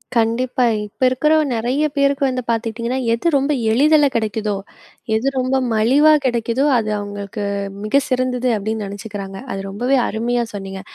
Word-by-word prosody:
கண்டிப்பா. 245 +3 +1 0.2
இப்ப 205 - -27
இருக்கிற 280 +5 +1 0.2
நிறைய 250 +7 0
பேருக்கு 280 0 +2
வந்து 255 -1 -2
பார்த்துக்கிட்டீங்கன்னா, 230 +2 -1
எது 235 +9 -1
ரொம்ப 275 +1 +1 0.2
எளிதில 295 +5 +4
கிடைக்குதோ, 220 -1 -1 0.6
எது 225 +5 0
ரொம்ப 255 +1 0 0.2
மலிவா 270 +8 +5
கிடைக்குதோ, 240 +2 0
அது 215 -2 -1
அவுங்களுக்கு 205 0 -6 0.4
மிக 245 +7 +2
சிறந்தது 255 -1 0
அப்பிடின்னு 215 +1 -3
நினைச்சுக்கிறாங்க. 200 -1 -7 0.2
அது 195 - -4
ரொம்பவே 245 +7 +1
அருமையாக 235 +2 -1
சொன்னீங்க. 195 -1 -6
235 Hz, 135 wpm, -19 LUFS, 215-260 Hz, 0.6 s, மலிவா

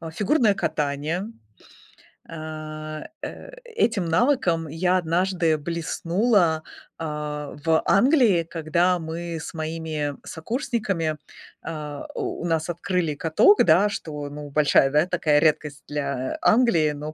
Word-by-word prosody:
А, 165 -1 -7
фигурное 210 - +2
катание. 155 +3 -2 1.0
А, 155 -1 -7 0.2
э, - - -8
этим 240 - 0
навыком 170 - +2
я 180 +4 +1
однажды 175 -1 +1
блеснула, 170 +2 +1 0.3
а, 150 -2 -5
в 160 -1 +2
Англии, 235 - +4
когда 170 +2 +1
мы 165 +1 -5
с 160 - -7
моими 155 -2 -3
сокурсниками, 195 - -2 0.5
э, 150 -3 -5
у - - -4
нас 165 0 0
открыли 175 -1 -1
каток, 165 - +4
да, 180 +5 +5
что, 150 -6 -5
ну, 145 0 -8
большая, 140 -1 +4
да, 150 +3 +3
такая 170 -5 +1
редкость 150 -2 0
для 140 -3 -3
Англии, 215 -11 +4
но 150 +1 -6
165 Hz, 115 wpm, -24 LUFS, 150-180 Hz, 1.0 s, да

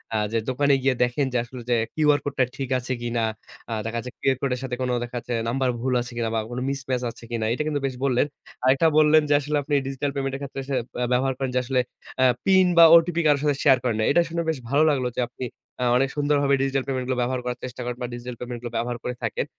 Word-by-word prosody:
আ - - +2
যে 115 - +1
দোকানে 140 +2 +2
গিয়ে 130 -1 +2
দেখেন 125 +3 0
যে 125 - +2
আসলে 125 +1 -9
যে 120 - +4 0.2
QR 150 -2 +3
কোডটা 135 -2 +1
ঠিক 135 -2 -4
আছে 130 +1 -6
কিনা। 120 -1 -1 0.5
আ - - 0
দেখা 115 +1 -2
যাচ্ছে 125 - -7
QR 135 -2 +2
কোডের 125 -3 -1
সাথে 125 -2 -3 0.3
দেখাচ্ছে 120 0 -5 0.2
নাম্বার 130 +1 0
ভুল 130 0 0
আছে 125 - -7
কিনা 115 -1 0
বা - - +2
কোনো 120 +1 -4
মিসম্যাচ 130 -2 -2
আছে 115 - -16
কিনা। 115 -2 -1
এটা 150 - -1
কিন্তু 145 -2 0
বেশ 130 -2 -2
বললেন। 125 0 +2 0.4
আরেকটা 135 +5 +4
বললেন 155 0 +6
যে - - +4
আসলে 150 +1 -1
আপনি 145 - -4
ডিজিটাল 135 +1 -2
পেমেন্ট 135 -1 -2
এর - - -5
ক্ষেত্রে 140 0 -5
সে 140 - -3 0.3
আ - - +2
ব্যবহার 130 +2 +2
করেন 130 -2 -2
যে 125 - +4
আসলে 130 +1 0 0.4
আ - - +6 0.2
পিন 190 -1 +5
বা 170 - +10
ওটিপি 170 0 +4
কারো 145 -1 +5
সাথে 145 -1 +2
শেয়ার 135 -3 +6
করেন 120 -4 0
না। 110 - +2
এটা 170 - +5
শুনে 170 0 -2
বেশ 160 - 0
ভালো 145 +3 +4
লাগলো 130 -4 +1
যে - - +2
আপনি 125 +1 -6 0.4
আ - - +1
অনেক 135 +1 +2
সুন্দরভাবে 145 -1 +2
ডিজিটাল 135 0 0
পেমেন্ট 130 -2 -2
গুলো 130 - -1
ব্যবহার 125 +1 -1
করার 125 0 -3
চেষ্টা 125 0 -6
করেন 120 0 -4
বা 125 - -2
ডিজিটাল 120 0 -6
পেমেন্ট 120 -1 -5
গুলো 120 -1 -6
ব্যবহার 120 0 -2
করে 125 - -2
থাকেন। - - -1
130 Hz, 250 wpm, -24 LUFS, 125-140 Hz, 0.5 s, বা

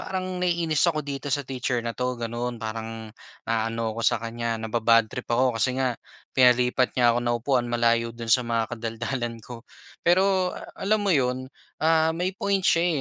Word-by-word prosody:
parang 185 -1 -4
naiinis 170 -4 +1
ako 155 -3 -1
dito 140 0 -5
sa 140 0 0
teacher 125 -2 -2
na 115 - -2
'to, 125 0 -2
ganun. 120 +1 -4
Parang, 110 0 -6 0.4
naaano 115 0 -1
ako - - -3
sa - - +4
kanya, 115 0 -3
naba-bad 115 0 +3
trip 125 - -6
ako, 120 0 +2
kasi 130 -1 +1
nga 130 -2 +1 0.4
pinalipat 125 0 +3
niya 120 -2 +4
ako 120 - +1
ng 120 0 +1
upuan 125 -3 +1
malayo 115 0 +2
do'n 115 -1 -7
sa 125 - +6
mga 115 0 -1
kadaldalan 115 +1 -3
ko. 120 -2 -9 0.4
Pero 185 +1 +3 0.2
alam 215 +2 +1
mo 195 - +3
'yon, 130 0 0 0.4
ah, 160 0 +4
may 180 +2 -1
point 200 -1 0
siya 165 -3 +3
125 Hz, 175 wpm, -25 LUFS, 115-155 Hz, 0.4 s, sa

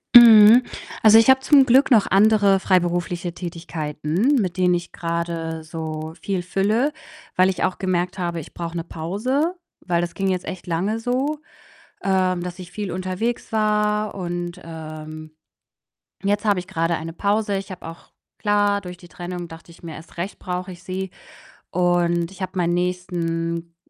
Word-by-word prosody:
Mhm. 230 0 +10 0.4
Also, 220 0 +8
ich 225 +2 +5
habe 265 0 +7
zum 275 0 +5
Glück 260 +4 +5
noch 220 -5 +5
andere 200 0 +4
freiberufliche 175 -2 0
Tätigkeiten, 170 - -2
mit 185 -2 -3
denen 180 -1 +3
ich 175 0 -3
grade 165 -1 -3
so 155 0 -6
viel 195 -3 -2
fülle, 210 +9 +1 0.5
weil 185 +1 +5
ich 185 - -2
auch 185 - 0
gemerkt 180 -1 -1
habe: 170 -1 -2
„Ich - - -13
brauche 170 0 -6
'ne 165 - -2
Pause“, 250 - -2 0.2
weil 170 -2 0
das 175 -1 -4
ging 195 0 -2
jetzt 185 -1 -1
echt 185 -1 -7
lange 190 +7 -1
so, 265 +6 -1 0.6
ähm, 185 -2 +1
dass 180 +1 -6
ich 180 -1 -9
viel 205 -1 -5
unterwegs 185 +7 -3
war 210 -1 +1
und, 175 -2 -4
ähm, 155 -1 -8 0.9
jetzt 205 +2 0
habe 205 -3 +2
ich 180 - -12
grade 165 -2 0
eine 165 +1 -6
Pause. 205 +3 0
Ich 195 0 -6
habe 180 - -9
auch 165 +1 -11 0.3
klar, 205 -1 +2
durch 180 -2 -8
die 175 -1 -16
Trennung 175 0 -6
dachte 165 +1 -13
ich - - -19
mir: 165 -2 -7
„Erst 160 - -14
recht 180 +4 -5
brauche 180 0 -4
ich 180 -1 -12
sie“ 190 +1 -4 0.6
und 175 -1 +1
ich 195 0 -13
habe 185 - -4
meinen 175 -1 +1
nächsten 170 -2 -2
180 Hz, 170 wpm, -22 LUFS, 170-205 Hz, 0.9 s, Mhm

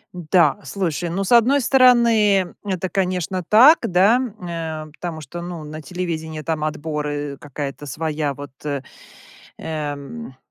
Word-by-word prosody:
М-да, 175 +1 +2
слушай, 175 -3 -2
ну, 190 +4 -2
с 195 - -4
одной 245 +4 +5
стороны, 235 -7 +4
это, 185 -2 -2
конечно, 185 0 -1
так, 260 +9 +8
да, 190 +5 +4
м, 250 -5 -4
нэ, 160 -3 -5
потому 165 -1 -6
что, 155 +5 -8
ну, 175 -2 -6
на 155 +1 -8
телевидении 160 -1 -4
там 155 0 -2
отборы, 150 -2 -3
какая-то 145 0 -6
своя 150 0 -2
вот, 145 0 -9
э, 140 -2 -2 0.8
эм, 150 - -6
165 Hz, 135 wpm, -21 LUFS, 150-195 Hz, 0.8 s, так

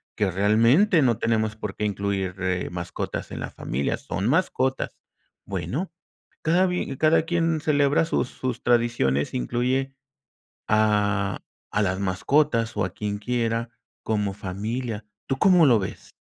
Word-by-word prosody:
que, 105 -2 +1
realmente, 115 - +4
no 120 -5 +3
tenemos 110 -1 0
por 105 -2 -6
qué 105 - -2
incluir, 100 -2 -2
eh, 90 -1 -1
mascotas 85 -1 -5
en - - -5
la - - -4
familia, 70 +3 -2
son 95 +3 -3
mascotas. 130 -4 +1 0.5
Bueno, 100 - -3 0.5
cada 175 +4 +3
bi 180 -6 -2
cada 155 +2 +4
quien 165 -1 0
celebra 145 -1 +3
sus 145 -6 0
sus 125 -1 -4
tradiciones, 115 - +1
incluye 130 - -1 0.7
a 105 -2 +2 0.3
a 105 - +1
las 95 -1 0
mascotas, 115 +5 +1
o 105 - +2
a - - -3
quien 105 0 -3
quiera 115 +1 -1 0.3
como 105 -3 -1
familia, 105 +4 -4 0.2
¿tú 135 - -1
cómo 180 -2 +6
lo 120 -6 +5
ves? 95 - -7
115 Hz, 140 wpm, -25 LUFS, 100-135 Hz, 0.7 s, cómo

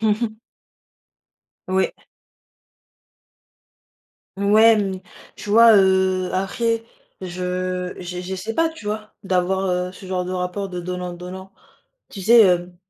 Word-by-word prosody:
Mmh 220 +1 +1
mh. 220 -1 -3 1.3
Oui. 190 0 +1 2.4
Ouais, 215 +3 +5
mmh, 195 -2 -2 0.4
tu 205 - -7
vois, 230 +1 +7
heu, 190 -1 +2
après, 225 +4 -1 0.4
je 180 0 -3
j'e 180 0 -6
j'essais 190 +4 -5
pas, 330 0 +2
tu 320 -9 -12
vois, 215 0 -4
d'avoir, 190 +1 0
heu, 180 0 -1
ce 190 - -12
genre 185 -1 -2
de 180 - -5
rapport 185 +2 -3
de 180 -1 -5
donnant-donnant. 180 +1 -7 0.6
Tu 195 - -8
sais, 230 +2 +7
hem, 180 -2 +2
190 Hz, 120 wpm, -21 LUFS, 180-210 Hz, 2.4 s, vois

